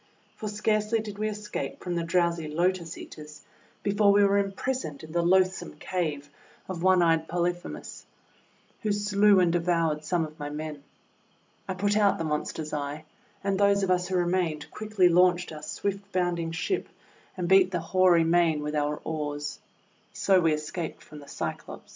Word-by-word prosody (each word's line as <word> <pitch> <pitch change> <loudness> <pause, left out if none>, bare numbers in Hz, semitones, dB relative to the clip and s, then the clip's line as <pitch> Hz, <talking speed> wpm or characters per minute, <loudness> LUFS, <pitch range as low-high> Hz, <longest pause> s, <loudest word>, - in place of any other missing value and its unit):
For 215 - -5
scarcely 215 +1 +1
did 210 -2 -7
we 215 0 0
escape 210 0 -5
from 180 - -3
the 170 - 0
drowsy 170 -1 +1
Lotus 170 +1 -1
Eaters 150 -1 -11 0.4
before 205 0 +4
we 205 0 +5
were 200 0 +4
impris 250 +7 -3
oned 145 -1 -8
in 155 - -10
the 170 +1 +1
loathsome 185 +2 +2
cave 155 -6 -3 0.4
of 185 -3 -5
one 185 -1 +5
eyed 165 -1 +2
Poly 175 +1 +1
phemus, 175 - -9 0.8
who 215 - 0
slew 205 -1 +4
and 175 -2 +3
devoured 165 -3 +1
some 165 +1 0
of 155 0 -13
my 145 0 -4
men. 150 -1 -6 0.8
I 190 - -3
put 205 +2 +1
out 205 -2 +3
the - - -3
monster's 155 0 -3
eye; 145 +1 -4 0.4
and 195 0 0
those 200 0 +4
of 185 - +1
us 180 0 +1
who 190 - -2
remained 175 -4 0
quickly 215 -4 +2
launched 180 0 +3
our 155 -1 -8
swift 200 +5 -4
bounding 175 -3 0
ship 165 - -2 0.5
and 180 -1 -2
beat 190 0 +6
the 180 -2 -1
hoary 175 0 +4
main 165 -2 +2
with 150 0 -3
our 150 0 0
oars. 145 -2 -4 0.5
So 190 -2 +3
we 165 -2 +3
escaped 155 +2 -5
from 150 - -12
the 145 - -13
Cyclops. - - -6
175 Hz, 175 wpm, -27 LUFS, 155-195 Hz, 0.8 s, beat